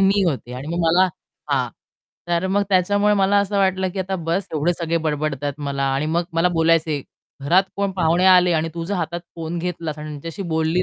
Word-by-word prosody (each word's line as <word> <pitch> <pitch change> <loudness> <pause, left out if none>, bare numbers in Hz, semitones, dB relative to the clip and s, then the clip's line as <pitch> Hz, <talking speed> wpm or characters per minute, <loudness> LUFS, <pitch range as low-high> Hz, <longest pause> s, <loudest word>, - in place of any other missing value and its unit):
मी 195 +1 +4
होते 130 -5 -4
आणि 130 +3 -7
मग 170 +1 -2
मला 180 +3 +4 0.4
हां, - - +1 0.6
तर 170 +1 +1
मग 200 +2 +1
त्याच्यामुळे 205 +2 +3
मला 200 0 +3
असं 200 0 0
वाटलं, 190 -1 +2
की 190 - -7
आता 190 +1 -2
बस्स 170 +3 -2
एवढे 160 +3 +1
सगळे 170 -1 -1
बडबडतायत 145 -2 -2
मला 140 0 -2
आणि 140 +3 -1
मग 165 +2 +1
मला 165 +2 +3
बोलायचे, 160 -3 +2 0.4
"घरात 180 +7 +4
कोण 200 0 0
पाहुणे 170 +1 +2
आले 180 -1 +6
आणि 160 0 +1
तू 170 -1 -4
जर 200 +4 -2
हातात 175 -2 -3 0.2
फोन 165 +1 -4
घेतलास 165 -3 -4
आणि 150 0 -7
त्यांच्याशी 165 +6 -6
बोलली 160 +3 +1
170 Hz, 200 wpm, -21 LUFS, 160-190 Hz, 0.6 s, आले